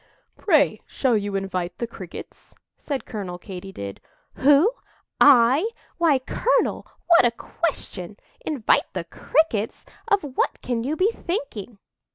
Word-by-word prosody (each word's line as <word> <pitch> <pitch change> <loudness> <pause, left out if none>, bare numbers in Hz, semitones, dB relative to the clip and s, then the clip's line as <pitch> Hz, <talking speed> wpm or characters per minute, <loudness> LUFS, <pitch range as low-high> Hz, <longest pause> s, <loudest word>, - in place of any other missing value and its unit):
"Pray, 290 - +3
shall 255 -4 +1
you 205 -1 -1
invite 185 -2 -3
the 235 - -2
Crickets?" 190 -6 -10 0.2
said 280 -3 -4
Colonel 195 -6 -5
Katy 190 +1 -8
did. 100 - -7 0.4
"Who? 290 - +5 0.5
I? 270 - +6 0.3
Why, 325 -5 +4
colonel, 260 - 0 0.2
what 345 -1 +6
a - - +5
question! 220 - -4 0.3
Invite 280 -8 +1
the 185 - -3
Crickets? 225 - 0 0.2
Of 405 -1 +2
what 275 -3 -1
can 240 -2 -1
you 285 +5 -1
be 380 +7 +2
thinking?" 260 - -5
245 Hz, 130 wpm, -24 LUFS, 195-300 Hz, 0.5 s, I